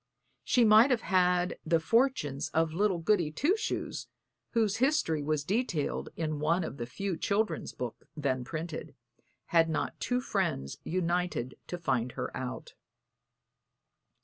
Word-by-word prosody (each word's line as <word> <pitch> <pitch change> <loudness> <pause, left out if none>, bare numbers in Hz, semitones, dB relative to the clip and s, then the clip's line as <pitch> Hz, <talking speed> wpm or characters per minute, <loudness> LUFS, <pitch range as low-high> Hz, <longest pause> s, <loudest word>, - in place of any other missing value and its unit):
She 245 -2 +4
might 220 +4 +7
have 245 -4 +2
had 180 -1 +2
the 165 0 +2
fortunes 160 - +1
of 160 -1 +2
little 195 +1 +2
Goody 170 -2 +2
Two 295 - +2
Shoes, 435 - -3 0.5
whose 225 -3 +2
history 260 - +2
was 150 0 0
detailed 195 - -1
in 155 -2 -2
one 165 +4 +2
of 140 - -5
the 120 - -4
few 195 +8 -3
children's 205 +6 -1
books 125 -3 -6
then 130 -4 0
printed, 160 +4 -6 0.6
had 165 -1 +5
not 160 - -2
two 250 0 0
friends 180 - -2
united 175 -7 -1
to 175 - -4
find 130 -7 -1
her - - -4
out. 130 -1 -5
170 Hz, 140 wpm, -30 LUFS, 150-210 Hz, 0.6 s, might